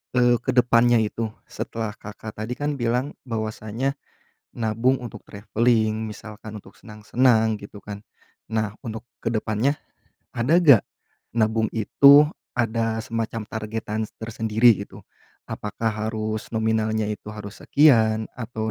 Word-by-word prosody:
eee, 120 0 +5
ke 130 - 0
depannya 120 -1 +5
itu 110 +1 -2 0.2
setelah 110 -2 -5
Kakak 105 +1 -9
tadi 115 +3 -3
kan 145 0 -2
bilang 125 +4 -1
bahwasanya 115 +3 -3 0.6
nabung 115 +3 +1
untuk 120 - -9
traveling, 110 +1 0
misalkan 110 0 -9
untuk 95 - -18
senang-senang, 110 +1 +1
gitu 100 0 -11
kan? 105 -1 -8 0.5
Nah, 110 -1 -1
untuk 110 +1 -6 0.2
ke 115 - -1
depannya 110 +6 0 0.5
ada 125 +8 +2
nggak 145 - +7 0.6
nabung 110 0 +2
itu 140 +6 +7 0.3
ada 115 -1 0
semacam 115 -1 -3
targetan 110 0 -4 0.2
tersendiri 110 0 +3
gitu? - - -14 0.5
Apakah 110 +2 -2 0.2
harus 110 -1 -3
nominalnya 110 -1 +1
itu 105 - -6
harus 105 -1 -9
sekian, 110 -7 +4
atau 110 -2 -3
110 Hz, 120 wpm, -24 LUFS, 110-120 Hz, 0.6 s, nggak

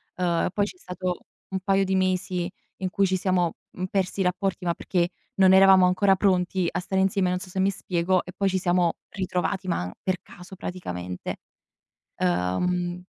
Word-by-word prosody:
Uhm, 175 -2 +1
poi 205 0 +2
c'è 185 -3 -9
stato 180 0 -4 0.3
un 190 0 -2
paio 195 +1 +2
di 190 0 0
mesi 185 -1 0 0.3
in 185 -1 -2
cui 195 +1 +2
ci 190 0 +1
siamo, 180 -2 +1 0.2
mhmm, 185 - -4
persi 195 0 -1
i - - +3
rapporti, 180 0 -1
ma 170 - +2
perché 175 -1 0 0.3
non 190 -1 +6
eravamo 190 -1 +7
ancora 190 +2 +4
pronti 185 -2 +1
a - - -1
stare 190 +1 0
insieme, 190 -1 +2
non 180 0 0
so 185 - -9
se 190 - -4
mi 190 - +3
spiego, 185 -1 0
e 180 - -9
poi 195 -1 +1
ci 190 - 0
siamo 175 -2 +2 0.2
ritrovati, 185 0 -2
ma 90 - -1
per 185 -1 0
caso 180 +2 -12
praticamente. 90 - -5 0.8
Uhm, 175 - 0
185 Hz, 185 wpm, -25 LUFS, 175-190 Hz, 0.8 s, eravamo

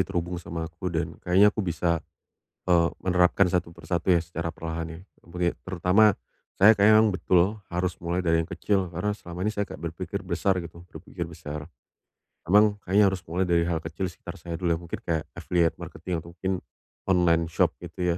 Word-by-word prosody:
terhubung 90 -1 -2
sama 85 -1 -5
aku 85 +3 -5
dan 80 -1 -3
kayaknya 100 +4 +5
aku 110 - -2
bisa, 85 -2 0 0.7
eee, 85 -2 +4
menerapkan 90 +1 +3
satu 90 -1 0
persatu 85 +1 -2
ya, 85 - +6
secara 85 0 -4
perlahan 80 0 -5
ya. 80 +1 -9 0.2
Apalagi 85 +1 -2
terutama 95 +3 +3 0.4
saya 105 +4 +8
kayaknya 105 +2 +6
memang 110 -3 +3
betul, 95 +3 +2
harus 90 0 -1
mulai 85 +1 -1
dari 80 0 +3
yang 80 - -10
kecil 95 -4 0
karena 90 +5 -2
selama 85 -4 -10
ini - - +2
kayak 100 -1 -2
saya - - -7
berpikir 85 +4 -5
besar 95 +2 +1
gitu, 85 -1 -8
berpikir - - -7
besar. 75 +2 -7 0.8
Memang 105 +1 +5
kayaknya 100 +3 +4
harus 95 - -4
mulai 90 +3 0
dari 85 -1 +3
hal 85 - +1
kecil 80 +4 -4
sekitar 85 - -10
saya 85 -1 -5
dulu 90 0 -1
ya, - - -1
mungkin 85 - -6
kayak 80 -3 0
affiliate 85 -2 +1
marketing 85 +2 -5
atau 85 +1 -9
mungkin 95 +2 -2 0.5
online 85 -3 +3
shop 80 0 +1
gitu 90 -1 -2
90 Hz, 185 wpm, -26 LUFS, 85-95 Hz, 0.8 s, saya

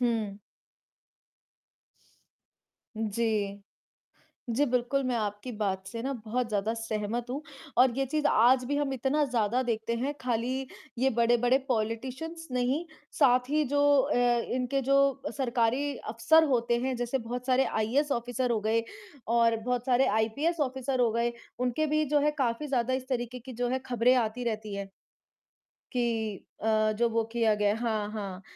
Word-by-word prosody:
हुँ। 225 -5 0 2.6
जी। 210 -2 -1 0.9
जी, 290 - +4
बिल्कुल 250 +2 0
मैं 255 -1 0
आपकी 210 +2 -3
बात 195 -3 -2
से 230 +4 -6
ना 270 +2 -2
बहुत 240 +2 -1
ज़्यादा 210 0 0
सहमत 225 +1 -3
हूँ 280 +4 -3 0.4
और 255 +1 +6
ये 270 - +2
चीज़ 300 +2 0
आज 250 0 +4
भी 285 +3 -1
हम 290 -2 0
इतना 270 +4 +1
ज़्यादा 245 -2 +1
देखते 230 -1 -2
हैं, 270 +5 -2
खाली 255 +2 -1 0.3
ये 265 +2 +3
बड़े-बड़े 240 +2 +4
पॉलिटिशियंस 260 +8 -3
नहीं, 255 +6 0 0.3
साथ 250 -3 +4
ही 305 +1 +2
जो 285 - +3 0.2
अ, 280 +3 0 0.4
इनके 255 +2 0
जो 275 +2 +3 0.4
सरकारी 255 +2 0
अफसर 230 +9 +3
होते 235 0 +1
हैं, 260 0 -1
जैसे 245 +2 -1
बहुत 245 +1 -5
सारे 260 0 +3
आईएएस 265 +8 0
ऑफ़िसर 245 +1 -1
हो 225 -2 +1
गए 220 +2 +1 0.4
और 230 0 +3
बहुत 245 +2 -2
सारे 255 +1 +4
आईपीएस 255 +11 0
ऑफ़िसर 265 -1 -1
हो 240 -2 +4
गए, 235 +1 0 0.3
उनके 250 +5 0
भी 305 +1 +1
जो 295 - +5
है 295 +1 +3
काफ़ी 245 +3 0
ज़्यादा 260 -2 0
इस 260 0 -4
तरीके 250 -1 -2
की 245 +1 -1
खबरें 245 +1 +4
आती 245 0 0
रहती 215 -2 -3
हैं 200 0 -5 1.0
कि 230 -4 -1 0.3
अ, 215 0 +2
जो 235 0 +3
वो 230 0 +1
किया 225 -2 +3
गया 205 0 +2
हाँ, 220 -3 -1
हाँ 200 -3 -5
240 Hz, 155 wpm, -29 LUFS, 225-260 Hz, 2.6 s, और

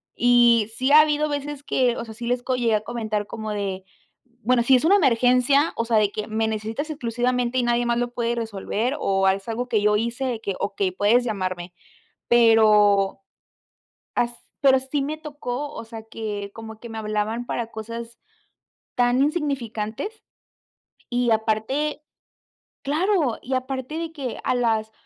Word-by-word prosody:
Y 240 -2 +4
sí 260 +3 0
ha 305 +1 +9
habido 300 0 +1
veces 290 0 -4
que, 250 -4 +1
o 235 - -4
sea, 220 - -9
sí 235 +1 -7
les 245 0 0
co 255 - 0
llegué 230 -3 +2
a 210 - 0
comentar 215 -3 -3
como 220 -1 -5
de, 195 -2 -3 0.6
bueno, 245 0 +3
si 260 +2 +5
es 250 - +2
una 390 +4 +6
emergencia, 255 - +3
o 230 - 0
sea, 230 -2 +2
de 205 -1 +3
que 215 - -5
me 220 0 0
necesitas 220 +8 -3
exclusivamente 245 -2 -1
y - - +1
nadie 240 0 +1
más 235 0 +1
lo 245 0 -2
puede 235 -1 -1
resolver, 225 +3 -2
o 195 0 +1
es 195 +3 -1
algo 245 +2 -2
que 215 -2 +2
yo 210 0 +3
hice, 235 +4 -2
de 235 -3 -2
que: 195 -3 -3
"Okey, 200 -2 -1
puedes 210 +6 +3
llamarme". 185 -5 -3 0.6
Pero, 210 -4 +5 1.0
as 240 0 0 0.3
pero 265 -1 +5
sí 265 +2 -3
me 305 +3 -3
tocó, 290 -2 -5
o - - -6
sea, 225 -1 -9
que 210 -2 -5
como 220 -1 -9
que 235 - -9
me 225 - -7
hablaban 215 +2 -2
para 235 -2 -3
cosas 230 +1 -7 0.8
tan 245 +2 +3
insignificantes 280 - -2 0.9
y 245 -1 +1
aparte 225 +8 -1 0.8
claro, 310 - +1
y 260 +1 -3
aparte 260 +3 -3
de 330 -1 -4
que 270 -6 -5
a - - +1
las 220 -3 0
235 Hz, 170 wpm, -23 LUFS, 220-260 Hz, 1.0 s, ha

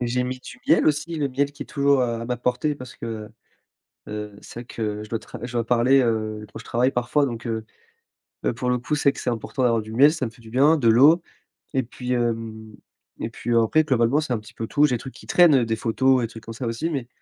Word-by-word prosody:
J'ai 125 +1 0
mis 130 +1 -4
du 125 0 -11
miel - - +4
aussi, 155 +2 0
le 145 -2 0
miel 140 +2 0
qui 145 - -7
est - - -23
toujours, 140 -1 +2
heu, 115 -2 -1
à - - -5
ma 125 0 -2
portée 125 +5 0
parce 125 -2 -10
que, 115 - -6
heu 110 -1 -6 0.8
heu, 105 -1 -6
c'est - - -9
vrai - - -12
que 105 -3 -4
je 105 - -12
dois 115 - -2
tra - - -11
je 120 - -5
dois 120 -1 0
parler, 125 +3 +4
heu, 110 -3 -1
quand 110 - -8
je 115 - -12
travaille 125 +3 +1
parfois 125 +4 +1
donc, 120 -3 -5
heu 110 -1 -3 0.8
heu, - - +1
pour 125 +2 -2
le 125 - +2
coup, 125 +5 -4
c'est 140 -1 +3
que - - -9
c'est - - -1
important 120 +2 -3
d'avoir 115 -2 +3
du 110 +1 -9
miel, 145 +5 +6
ça 155 -6 -2
me 115 - -5
fait 115 - -19
du 110 - -13
bien, 140 +6 +5
de 120 -6 +1
l'eau 145 +9 +6 0.5
et 130 - +2
puis, 125 +1 -5
hem, 115 -2 -2 0.5
et - - -2
puis 120 - -3
après 115 +8 +4
globalement 130 0 +2
c'est 150 -4 -3
un 120 - 0
petit 105 - -14
peu 115 - -4
tout, 145 - +3
j'ai 140 -4 +3
des - - -1
trucs 130 - -9
qui - - -14
traînent, 170 -5 +6
heu, 125 - +3
des 115 - 0
photos 130 +3 +2
et - - +1
trucs 115 0 -12
comme 115 - -8
ça, 120 +2 -5
aussi, 115 +8 -2
mais 135 -6 -3
120 Hz, 270 wpm, -23 LUFS, 115-135 Hz, 0.8 s, miel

